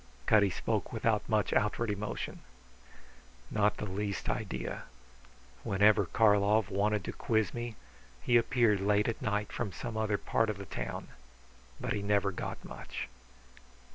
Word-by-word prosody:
Cutty 100 +2 +5
spoke - - -2
without 110 -2 0
much 110 -2 +2
outward 105 +2 +1
emotion. 105 +1 -4 1.1
"Not 105 -1 +2
the - - -3
least 100 0 -3
idea. 65 -1 -3 0.8
Whenever 105 -1 +4
Karlov 105 0 +3
wanted 105 0 +1
to - - -4
quiz 110 -5 0
me, 120 -1 -4 0.4
he 120 - +1
appeared 115 -3 +4
late 105 +1 +3
at 115 - -2
night 105 -1 -1
from 110 -5 -3
some 115 +5 -6
other 110 -2 +1
part 110 +2 +1
of 105 - -2
the 100 - -7
town. - - -5 0.7
But - - -2
he 105 - -2
never 100 -1 +2
got 85 - -5
much." - - -6
105 Hz, 140 wpm, -32 LUFS, 100-110 Hz, 1.1 s, Cutty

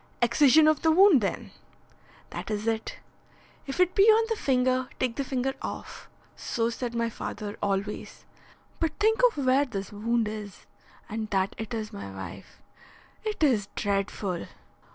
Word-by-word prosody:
"Excision 285 +5 +5
of 310 -1 +3
the 320 - +3
wound, 350 - +6
then?" 195 - -3 0.8
"That - - -6
is 210 0 -2
it. 225 -1 -2 0.7
If 270 - -5
it 365 0 +4
be 395 - +5
on 445 +1 +6
the 450 - +1
finger, 255 -5 +1
take 250 -3 0
the 280 - -1
finger 265 0 -1
off. - - -7 0.3
So 230 0 -1
said 235 0 -4
my 235 0 +1
father 210 -2 -6
always. 200 +1 -3 0.5
But 325 -2 0
think 445 +3 +3
of 285 - -4
where 260 +2 +4
this 200 -7 -6
wound 225 +2 0
is, 210 -2 -7 0.4
and 215 0 -4
that 195 -2 0
it 225 +2 -4
is 215 -1 -5
my 200 - -7
wife. 95 0 -10 0.6
It 430 -6 -2
is 225 -9 +3
dreadful!" 195 -2 -2
235 Hz, 155 wpm, -27 LUFS, 210-285 Hz, 0.8 s, wound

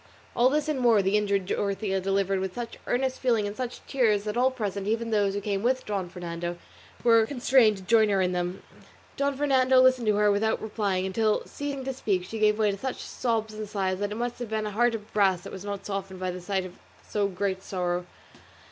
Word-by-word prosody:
All 245 +2 +5
this 300 +2 0
and 300 -3 -1
more 230 -5 +4
the 195 +2 +2
injured 200 -2 +1
Dorothea 195 0 -1
delivered 195 0 +1
with 190 -1 -4
such 235 -1 -6
earnest 260 +1 0
feeling 230 -5 +2
and 205 0 -4
such 250 0 -5
tears 220 -6 +2
that 210 0 -3
all 250 +2 +4
present, 205 -6 -4
even 230 +1 -1
those 200 -2 +2
who 205 - -2
came 200 -1 -1
with 255 +3 0
Don 195 -4 -3
Fernando, 175 -1 -5 0.5
were 230 -2 +5
constrained 245 -5 +3
to 190 - -11
join 220 +2 +4
her 200 -1 +2
in 180 -1 +2
them. 180 +1 -3 0.5
Don 280 -1 0
Fernando 265 -2 +4
listened 255 -2 +4
to 210 - +4
her 210 0 +4
without 220 +2 +1
replying, 205 -4 -1
until, 215 +3 +1
ceasing 285 -2 -5
to 265 - -2
speak, 200 -8 -1
she 220 +4 -6
gave 210 0 +3
way 215 -2 +2
to 200 - -5
such 260 +2 -3
sobs 225 -3 -2
and 215 -1 -6
sighs 190 -3 -1
that 205 0 -2
it - - -3
must 240 +1 -3
have 240 -3 -5
been 220 -1 -1
a 210 - -3
heart 240 +3 +2
of 210 -1 -9
brass 195 -4 +3
that - - -9
was 190 - -7
not 200 -1 -5
softened 195 -2 -4
by 185 0 -2
the 180 0 -7
sight 190 0 -1
of 180 - -11 0.3
so 205 -1 0
great 190 0 -2
sorrow. 180 -2 -2
210 Hz, 230 wpm, -27 LUFS, 195-235 Hz, 0.5 s, All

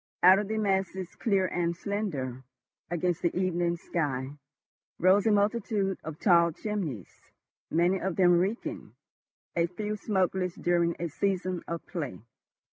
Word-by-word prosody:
Out 185 +2 +8
of 205 - -2
the 220 +1 -2
masses, 190 -3 -1
clear 195 -4 +1
and 170 -1 -1
slender 150 - -3 0.5
against 175 0 -1
the 170 0 0
evening 175 -2 0
sky, 140 -6 -2 0.7
rose 190 +4 +4
a - - +5
multitude 205 -2 +1
of 155 -1 -7
tall 170 -3 +5
chimneys, 165 - -5 0.4
many 175 +4 +2
of 190 -2 -2
them 175 -2 +5
reeking, 200 +6 -3 0.6
a 170 0 +2
few 210 +4 -4
smokeless 190 -3 0
during 170 -1 +1
a 170 - -2
season 185 +1 -1
of 170 0 -4
"play." 160 -5 -4
180 Hz, 135 wpm, -29 LUFS, 170-195 Hz, 0.7 s, Out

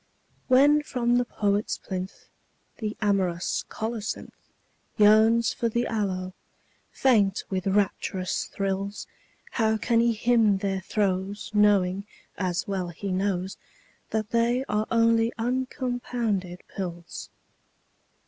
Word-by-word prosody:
When 285 +4 +6
from 245 -4 +1
the 245 - +2
poet's 205 -2 0
plinth 185 0 -6 0.5
The 215 -2 -3
amorous 185 -4 0
colocynth 220 -1 -5 0.5
Yearns 220 +2 +5
for 235 - -1
the 235 +2 0
aloe, 185 -4 -2 0.6
faint 210 -7 +2
with 185 0 -1
rapturous 190 -1 0
thrills, 195 +1 -3 0.5
How 220 -2 +1
can 230 +1 +2
he 235 0 +3
hymn 220 -2 +3
their 195 -1 -2
throes 195 +1 -1
Knowing, 200 -2 +3 0.3
as 180 -3 -2
well 190 -3 -2
he 180 +3 -5
knows, 190 0 -1 0.5
That 215 -1 -2
they 235 +3 +2
are 210 +1 0
only 230 0 +3
uncompounded 245 -6 -2
pills? 175 -3 -6
210 Hz, 110 wpm, -26 LUFS, 190-230 Hz, 0.6 s, When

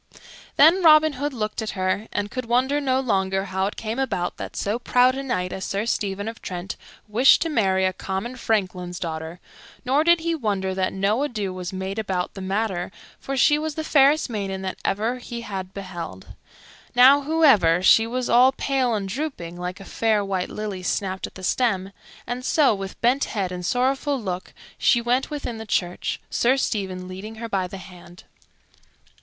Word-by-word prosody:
Then 330 +6 +6
Robin 310 -1 +7
Hood 285 +2 -3
looked 215 -3 -3
at 220 - -3
her, 185 +3 -1
and 205 0 -2
could 255 -1 -4
wonder 260 +5 +1
no 260 -2 +1
longer 195 -6 0
how 190 0 -1
it 205 - -5
came 225 +3 -4
about 180 -10 -2
that - - -7
so 210 +4 -1
proud 250 +1 +3
a 270 - -4
knight 185 -9 -2
as 190 - -5
Sir 200 +3 -2
Stephen 205 -3 -2
of 225 0 -7
Trent 180 +1 -5 0.3
wished 235 +5 +5
to 330 - -2
marry 190 -9 +2
a 185 - +1
common 195 +7 -4
franklin's 185 -7 -2
daughter; 160 0 -5 0.5
nor 275 +4 +3
did 340 0 +4
he 335 0 0
wonder 200 -10 -1
that 185 0 0
no 200 +6 0
ado 215 -10 -2
was 180 -1 -5
made 190 +2 -4
about 190 -4 -2
the 195 - -8
matter, 190 -2 -2 0.3
for 275 0 -4
she 295 +3 +4
was 310 -1 -3
the 315 - -3
fairest 295 +1 +4
maiden 195 -5 -4
that 190 - -4
ever 225 +5 -1
he 235 -1 -7
had 190 -4 -6
beheld. 175 - -8 0.6
Now, 265 +3 +7
however, 270 - +4
she 225 +4 +6
was 250 +1 -2
all 250 +3 +5
pale 260 -4 0
and 200 -2 -3
drooping, 200 - -4
like 180 +2 -5
a 195 - -10
fair 215 -2 +1
white 190 -2 -2
lily 210 -3 -5
snapped 190 +1 -2
at - - -17
the 185 - -10
stem; 195 -3 0 0.3
and 245 +1 -4
so, 285 -2 +3
with 195 -1 -6
bent 250 +4 +3
head 195 -4 -3
and 180 0 -5
sorrowful 265 - 0
look, 185 -4 -5 0.3
she 240 - +4
went 245 +3 0
within 285 -7 -5
the 220 - -7
church, 180 -3 -1
Sir 255 +3 +2
Stephen 190 -7 -2
leading 195 +4 -8
her 230 +1 -6
by 195 -4 -1
the 195 - -8
hand. 180 -1 -13
210 Hz, 190 wpm, -23 LUFS, 190-255 Hz, 0.6 s, Robin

